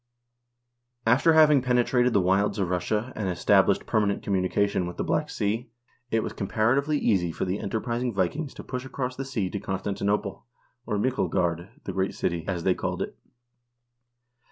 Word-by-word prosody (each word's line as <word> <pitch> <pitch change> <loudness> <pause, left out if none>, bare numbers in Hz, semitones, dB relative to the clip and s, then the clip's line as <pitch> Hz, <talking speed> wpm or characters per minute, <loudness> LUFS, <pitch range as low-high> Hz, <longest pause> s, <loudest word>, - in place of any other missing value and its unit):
After 130 +8 +4
having 150 -3 +6
penetrated 125 0 +2
the 100 - +4
wilds 95 +4 +2
of 95 -3 -1
Russia, 105 +7 -1
and 100 -3 -2
established 90 - +3
per 110 - +2
manent 100 -1 -1
communication 95 -1 +1
with 90 - -7
the - - -1
Black - - 0
Sea, 115 +4 -2 0.4
it 110 -1 +1
was - - -4
comparatively 130 +9 +1
easy 95 -10 +1
for - - -3
the 95 +2 -2
enterprising 120 +4 -2
Vikings 115 - -2
to - - -8
push 125 -1 -5
across 130 -1 -4
that 135 - -4
sea 115 -8 -2
to 100 - -3
Constanti 95 +1 -4
nople, 100 -1 -1 0.5
or 105 - 0
Myklegard 90 -7 0
(the - - -5
great 95 0 -1
city), 85 -2 -2
as 90 -3 -2
they 95 - +3
called - - -2
it. - - -8
105 Hz, 170 wpm, -26 LUFS, 95-125 Hz, 0.5 s, having